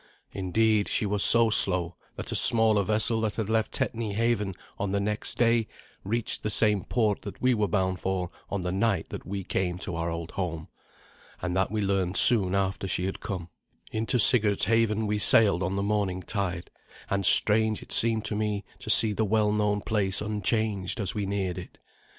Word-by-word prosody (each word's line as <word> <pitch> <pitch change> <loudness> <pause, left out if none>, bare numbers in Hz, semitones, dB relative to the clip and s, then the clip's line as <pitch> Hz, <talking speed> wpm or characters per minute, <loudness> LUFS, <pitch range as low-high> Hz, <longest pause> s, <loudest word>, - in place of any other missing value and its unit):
Indeed, 105 +3 0
she - - -2
was 100 0 +1
so 115 -1 +6
slow 90 -4 +5 0.2
that - - -8
a - - -3
smaller 110 -3 +3
vessel 110 +3 0
that 110 -2 -3
left 110 0 -1
Tetney 110 -3 -3
haven 110 -4 -2 0.2
on 100 -1 -3
the 100 - 0
next 105 +1 -4
day 115 -2 +1 0.4
reached 115 +3 -3
the 105 - -4
same 105 -2 +1
port 110 -4 -1
that - - -10
we 130 0 +1
were 105 -3 -1
bound 95 -1 -2
for 95 -2 -4 0.2
on 100 - -4
the 90 0 -4
night 95 -2 -2
that - - -9
we 100 0 -5
came 90 -1 -3
to 90 -1 -7
our 85 0 -3
old 85 0 -7
home. 85 -4 -6 0.7
And 90 0 -4
that 95 0 0
we 105 +1 -3
learned 95 -2 -1
soon 100 -6 +5
after 95 0 -3
she 90 -1 -3
had 95 - -5
come. 90 -3 -7 0.4
Into 110 +3 -2
Sigurd's 105 -3 +5
haven 110 0 0
we 105 0 -2
sailed 100 -4 +5
on 95 +2 -3
the 100 - -2
morning 100 -3 -2
tide, 90 -5 -5 0.4
and 100 0 -2
strange 110 +3 +5
it - - -16
seemed 110 -2 +2
to 105 - -2
me 105 -1 -3
to - - -10
see 110 -2 +7
the 110 - -2
well 105 0 0
known 105 -1 -1
place 100 -4 -1
unchanged 105 -1 -3
as 100 -3 +1
we 105 -2 -4
neared 95 -2 -4
it. 90 - -13
100 Hz, 190 wpm, -25 LUFS, 95-110 Hz, 0.7 s, see